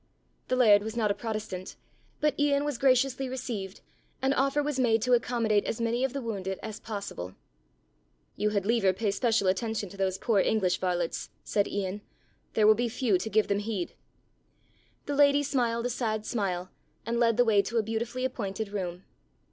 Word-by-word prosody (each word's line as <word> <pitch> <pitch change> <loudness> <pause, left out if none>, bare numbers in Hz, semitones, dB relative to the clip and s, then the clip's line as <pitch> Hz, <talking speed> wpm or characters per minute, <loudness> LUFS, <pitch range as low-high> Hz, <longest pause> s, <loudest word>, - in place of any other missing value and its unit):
The 255 - +1
laird 215 -5 +6
was 220 +2 -5
not 215 -3 +2
a - - +2
protestant, 215 -5 -5 0.5
but 300 0 +3
Ian 290 0 +2
was 290 -5 -2
graciously 265 0 +2
received 230 -7 -5 0.4
and 265 +1 +2
offer 275 +2 +1
was 290 -2 -2
made 225 -3 +3
to 250 0 +2
accommodate 230 -3 +2
as 225 - -3
many 235 +2 0
of 265 - +1
the 275 0 -4
wounded 195 -4 -3
as 220 -2 -6
possible. 200 - -6 1.0
"You 210 - +1
had 200 -2 -1
liever 210 -4 +3
pay 205 +2 -1
special 225 -1 +1
attention 210 +1 -1
to 200 - -12
those 190 -1 0
poor 220 -1 +2
English 190 -2 +2
varlets," 175 -2 -2
said 205 -1 +1
Ian. 200 0 -3 0.5
"There 215 - +4
will 215 - +8
be 235 +2 -1
few 225 -5 +1
to 220 - -4
give 215 0 +2
them 200 0 +1
heed." 205 -4 -3 1.1
The 290 - -2
Lady 285 0 +5
smiled 240 -4 0
a - - +1
sad 215 -3 -2
smile 185 -5 -2 0.3
and 235 +1 -1
led 230 -2 +3
the 245 - +5
way 210 -3 +4
to 225 +4 -3
a 225 - +3
beautifully 235 +4 -2
appointed 215 -4 -3
room. 185 -3 -4
220 Hz, 185 wpm, -28 LUFS, 200-245 Hz, 1.1 s, will